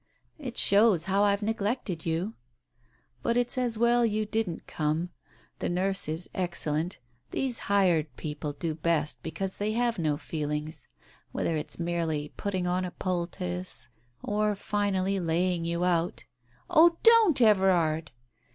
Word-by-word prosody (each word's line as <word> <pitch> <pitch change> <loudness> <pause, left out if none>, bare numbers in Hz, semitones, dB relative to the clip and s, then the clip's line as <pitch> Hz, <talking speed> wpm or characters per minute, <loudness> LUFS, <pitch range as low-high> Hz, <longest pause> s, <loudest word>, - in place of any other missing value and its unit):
"It 255 -5 -6
shows 200 -4 +5
how 195 +1 +2
I've 200 0 +2
neglected 210 -5 -2
you." 170 +7 -1 0.9
"But 235 - +1
it's 245 0 0
as 245 -3 0
well 235 +1 +3
you 215 -1 +1
didn't 210 -5 -2
come. 155 +3 -2 0.5
The - - -2
nurse 190 -1 +1
is 160 +3 0
excellent. 175 -2 -1 0.3
These 260 -3 -2
hired 170 -9 +2
people 150 -1 -4
do 160 +2 -3
best 155 -1 -1
because 190 +4 -4
they 210 +1 -1
have 235 -2 0
no 155 -3 0
feelings, 150 0 -4 0.4
whether 165 - -1
it's 150 - -2
merely 165 -4 -2
putting 190 -3 -2
on 180 +1 0
a 180 - -3
poultice, 180 -3 -3 0.3
or 210 0 0
finally 195 -1 0
laying 170 0 0
you 170 +1 -1
out 175 -1 0 0.2
" 125 - -33
"Oh, 340 -1 +5
don't, 455 - +6
Everard!" 180 - +3
185 Hz, 140 wpm, -28 LUFS, 165-210 Hz, 0.9 s, don't